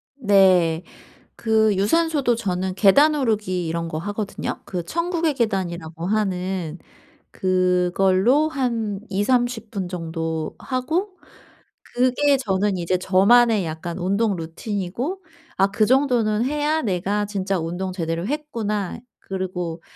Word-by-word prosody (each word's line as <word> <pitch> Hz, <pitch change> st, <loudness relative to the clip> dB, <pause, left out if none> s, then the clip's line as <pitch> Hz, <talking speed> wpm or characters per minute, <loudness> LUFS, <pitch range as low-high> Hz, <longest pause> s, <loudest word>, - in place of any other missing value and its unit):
네. 185 Hz, -, +4 dB, 0.5 s
그 220 Hz, -2 st, +2 dB
유산소도 280 Hz, -, +2 dB
저는 190 Hz, -4 st, -2 dB
계단 280 Hz, +11 st, +5 dB
오르기 210 Hz, -, -1 dB
이런 165 Hz, +1 st, -2 dB
거 155 Hz, -, -4 dB
하거든요. 205 Hz, +4 st, -4 dB
그 180 Hz, -3 st, -4 dB
천국의 335 Hz, -, -1 dB
계단이라고 175 Hz, -8 st, -2 dB
하는 185 Hz, -5 st, -1 dB, 0.5 s
그걸로 185 Hz, -, +2 dB
한 230 Hz, -8 st, -2 dB
20-30 230 Hz, +2 st, 0 dB
분 195 Hz, -4 st, -3 dB
정도 165 Hz, -2 st, -4 dB
하고 330 Hz, +10 st, -2 dB, 0.8 s
그게 255 Hz, +3 st, +3 dB
저는 200 Hz, -4 st, 0 dB
이제 175 Hz, +1 st, 0 dB
저만의 200 Hz, +3 st, +4 dB
약간 165 Hz, +2 st, -5 dB
운동 200 Hz, +3 st, +1 dB
루틴이고 205 Hz, -, -4 dB, 0.4 s
'아 195 Hz, -, +4 dB
그 215 Hz, +1 st, +2 dB
정도는 240 Hz, -5 st, +2 dB
해야 300 Hz, +3 st, 0 dB
내가 200 Hz, +1 st, -1 dB
진짜 195 Hz, -2 st, -2 dB
운동 175 Hz, +3 st, -3 dB
제대로 165 Hz, +1 st, -3 dB
했구나.' 230 Hz, -10 st, -3 dB, 0.2 s
그리고 180 Hz, -3 st, -4 dB
200 Hz, 240 characters per minute, -22 LUFS, 180-245 Hz, 0.8 s, 계단